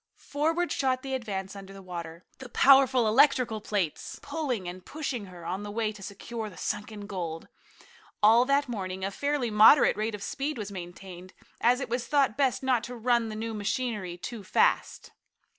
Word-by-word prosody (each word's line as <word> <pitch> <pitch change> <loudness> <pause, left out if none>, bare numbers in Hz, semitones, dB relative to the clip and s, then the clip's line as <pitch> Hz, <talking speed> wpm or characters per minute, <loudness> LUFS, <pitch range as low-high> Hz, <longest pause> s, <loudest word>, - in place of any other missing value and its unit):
Forward 325 +4 -1
shot 260 -1 0
the 270 -1 -4
Advance 200 -6 -4
under 195 0 -10
water, 170 -2 -8
the 260 - -9
powerful 260 -2 +5
electrical 240 -2 +3
plates 200 -7 -3
pulling 250 - -3
and 180 +1 -7
pushing 275 -6 -4
her 180 -3 -12
on 185 +4 -3
the 205 - -6
way 215 +1 -1
to 210 -2 -13
secure 215 +3 -6
the 185 - -15
sunken 210 0 -4
gold. 170 -5 -5 0.8
All 225 +3 +7
that 280 +1 +2
morning 190 -5 -4
a 195 - -2
fairly 280 0 -1
moderate 220 +6 +7
rate 215 +1 -2
of 200 - -8
speed 290 +5 -3
was 210 -2 -5
maintained, 180 0 -9 0.3
as 245 +2 +3
it 275 - -3
was 240 +1 -2
thought 275 -6 +2
best 270 -2 +1
not 255 -3 +2
to 250 - -7
run 235 -1 +1
the 215 - -6
new 225 +1 -4
machinery 210 -4 -3
too 220 +4 -7
fast. - - +1
220 Hz, 175 wpm, -28 LUFS, 195-255 Hz, 0.8 s, All